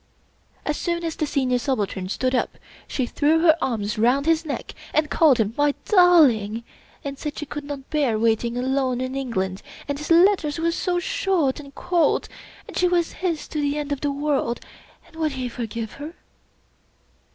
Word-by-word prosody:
As 300 - -1
soon 340 -1 -2
as 330 -2 -2
the 305 - -1
Senior 255 -3 +1
Subaltern 205 -8 -2
stood 255 +5 -1
up, 250 - 0 0.3
she 260 - -1
threw 305 +6 +2
her 320 -2 +6
arms 215 -4 -1
round 250 +5 +3
his 325 0 +2
neck, 285 - -4 0.2
and 305 0 +2
called 300 -7 +5
him 220 -1 0
" - - -28
my 290 -1 +3
darling 280 - +5 0.2
" - - -29
and 275 -1 -5
said 300 -1 -5
she 300 - -4
could 295 0 -6
not 280 -2 -7
bear 280 -8 +1
waiting 230 +2 +1
alone 260 0 0
in 255 0 -3
England, 200 -9 -2 0.3
and 285 0 -3
his 300 - -6
letters 340 -3 +4
were 335 +1 +1
so 355 +1 -1
short 360 - 0
and 280 -1 -12
cold, 350 -2 +1 0.4
and - - -10
she 360 - +3
was 350 -2 +1
his 340 -5 -1
to 305 - -2
the 285 0 0
end 295 -1 -4
of 285 - -2
the 290 - 0
world, 280 -4 -1 0.5
and 330 - -21
would 310 -3 0
he 255 -1 -3
forgive 230 -2 -5
her? 300 +4 -8
285 Hz, 190 wpm, -23 LUFS, 250-320 Hz, 0.5 s, her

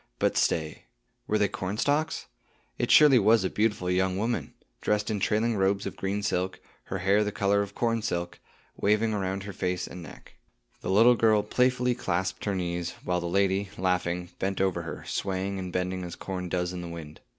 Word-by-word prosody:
But - - +1
stay. 80 -1 0 0.4
Were 110 - +2
they 105 -1 +3
cornstalks? 145 +13 -1 0.5
It - - 0
surely 145 -4 +8
was 110 -2 +4
a 95 - -1
beautiful 105 -4 0
young 95 0 +1
woman, 115 +4 -2 0.3
dressed 105 +1 0
in 105 - -1
trailing 110 +3 +1
robes 100 0 +1
of - - -4
green 100 +2 -2
silk; 95 -2 -1 0.3
her 95 - -3
hair 100 +3 +3
the 105 - -2
color 100 0 +2
of 100 0 -5
corn 115 -1 0
silk, 85 -4 -3 0.4
waving 105 +2 +2
around 95 -1 -2
her 100 0 -7
face 90 0 -2
and 90 - -9
neck. 80 - -12 0.5
The - - -4
little 115 +6 +6
girl 110 -2 +3
playfully 125 +2 +2
clasped 95 -5 -2
her 100 -2 0
knees, 85 -1 -3
while 90 0 0
the 85 - -3
lady, 100 +2 +1
laughing, 90 -1 0
bent 95 0 -1
over 95 -2 +1
her, 85 - -7
swaying 95 0 -2
and 90 -1 -5
bending 90 +1 -2
as 85 -1 -6
corn 90 -2 -5
does 90 0 -1
in 90 - -5
the 85 - -6
wind. 80 -3 -9
95 Hz, 190 wpm, -28 LUFS, 90-105 Hz, 0.5 s, surely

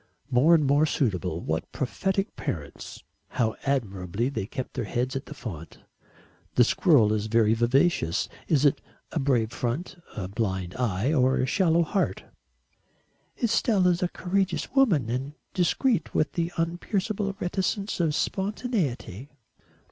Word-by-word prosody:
"More 140 +7 +6
and 155 -3 +2
more 145 +3 +4
suitable. 90 - -1
What 80 +1 -3
prophetic 190 - -2
parents! 75 -5 -6 0.2
How 110 -2 0
admirably 105 -4 -1
they 120 -8 -4
kept 130 +2 -5
their 125 -4 -3
heads 125 +6 -2
at 135 - -4
the 150 - -8
font. 85 - -8 0.8
The 125 - +7
squirrel 120 - +4
is 110 0 -1
very 110 -1 +3
vivacious 120 - +2 0.2
is 150 -2 +3
it 145 - +3 0.3
a 165 - -1
brave 125 -5 +1
front, 145 +11 -3 0.2
a 95 -3 -3
blind 95 -3 -2
eye 120 +3 0
or 130 -2 +3
a - - +1
shallow 170 +3 +3
heart?" 190 +5 -1 1.2
"Estelle 225 -4 +2
is 180 -1 +3
a 180 - +2
courageous 190 +5 -1
woman 205 - +3
and 130 +5 -3 0.2
discreet 180 - +1
with 155 - +2
the 170 0 -2
unpierceable 195 +4 -1
reticence 195 +3 -1
of 160 -3 +1
spontaneity." 190 - -2
140 Hz, 140 wpm, -26 LUFS, 115-180 Hz, 1.2 s, The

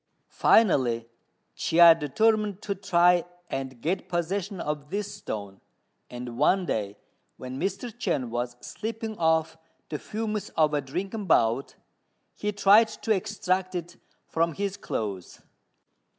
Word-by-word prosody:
Finally, 125 - +3 0.5
Chia 170 0 +7
determined 210 +6 +1
to 200 - -1
try 180 -2 +3 0.3
and 130 -2 -4
get 180 +7 -2
possession 185 +3 -2
of 150 -2 -4
this 205 +1 -3
stone; 100 -2 -7 0.5
and 120 -1 -7
one 190 -1 +3
day, 105 -8 -2 0.4
when 130 +1 -7
Mr. 215 +5 -3
Chên 130 - -1
was 120 +1 -3
sleeping 220 0 -5
off 160 -1 +1 0.3
the 150 - -4
fumes 215 -1 -4
of 155 -1 +3
a 145 - +1
drinking 190 - -4
bout, 120 -3 +2 0.6
he 210 - -2
tried 205 +2 +6
to 220 +1 -5
extract 190 -2 -1
it 175 0 -5 0.3
from 165 0 0
his 200 -1 -2
clothes. 100 - -5
175 Hz, 125 wpm, -27 LUFS, 135-205 Hz, 0.6 s, Chia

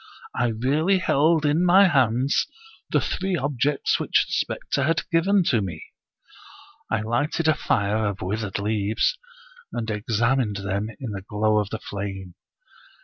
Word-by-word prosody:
I 120 - +1
really 140 - +1
held 160 -2 +2
in 150 +4 +2
my 190 +2 +6
hands 130 -3 +2 0.4
the - - +2
three 190 0 -2
objects 145 0 0
which - - +2
the - - -13
specter - - -1
had 165 0 0
given 185 +4 +3
to 115 -4 +2
me 90 -5 -5 1.1
1 110 - -1
I - - -5
lighted 145 +8 -1
a 155 - +5
fire 105 -6 0
of 100 -1 -4
withered 105 +1 -3
leaves, 105 - 0 0.5
and 110 - -4
examined 115 +2 0
them 100 +2 -3
in 125 -6 -5
the 100 -1 -5
glow 105 +2 +1
of 105 -1 -2
the 110 - -4
flame. 95 -3 -6
115 Hz, 150 wpm, -24 LUFS, 105-150 Hz, 1.1 s, my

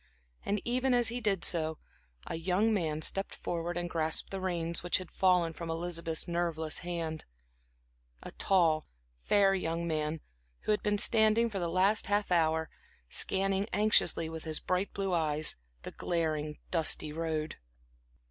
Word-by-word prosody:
And 205 +1 0
even 250 +1 +2
as 240 -2 +3
he 245 +1 -3
did 195 -5 +1
so, 160 -2 +2 0.5
a - - -5
young 185 +7 +1
man 160 -6 -1
stepped 195 +4 0
forward 175 0 -3
and 175 0 -2
grasped 160 -2 -1
the 195 -1 -4
reins 170 -2 -1
which 175 - +2
had 185 -2 -8
fallen 180 -3 +2
from 165 +1 -7
Elizabeth's 165 -1 -2
nerveless 170 -2 -1
hand; 165 -3 -4 1.0
a - - -8
tall, 165 -5 +2 0.3
fair 195 - +3
young 170 -2 -2
man 155 -1 -2 0.4
who - - -1
had 210 - +1
been 210 0 +1
standing 220 +2 +4
for 195 - -3
the 170 -1 -1
last 190 +5 +2
half 205 -1 0
hour, 160 -2 +2 0.4
scanning 195 +1 0
anxiously, 205 -5 +3
with 160 0 -7
his 155 -1 -1
bright 185 +2 -1
blue 195 -2 -2
eyes, 155 -2 0 0.3
the - - -6
glaring 155 -3 -2
dusty 155 -2 +2
road. 160 -1 -3
175 Hz, 155 wpm, -31 LUFS, 160-195 Hz, 1.0 s, standing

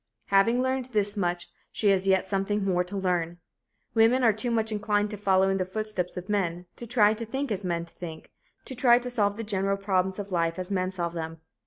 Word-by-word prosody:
Having 230 +6 +4
learned 260 -1 -1
this 210 -4 0
much, 175 -3 -1 0.2
she 210 - +1
has 195 -1 +2
yet 190 0 +3
something 195 +1 -1
more 180 -2 +2
to 190 +3 -6
learn. 175 -3 -1 0.6
Women 230 +3 +4
are 225 -3 +5
too 220 +4 -1
much 225 -1 0
inclined 210 0 0
to - - -4
follow 190 -1 +3
in 195 0 +1
the - - +2
footsteps 185 -2 -4
of 180 +1 -6
men, 180 -4 -1
to 235 - -7
try 215 -3 +4
to 225 +1 -5
think 265 +3 -3
as 200 -1 -2
men 170 -2 -2
think, 165 -1 -10 0.3
to - - -6
try 240 -1 +5
to 250 0 -4
solve 205 -4 +1
the 225 - -4
general 195 -2 -1
problems 190 -1 0
of 200 -1 -6
life 165 -2 0
as 185 +1 -5
men 185 -1 0
solve 175 -3 -3
them. 165 -1 -6
195 Hz, 220 wpm, -27 LUFS, 180-220 Hz, 0.6 s, are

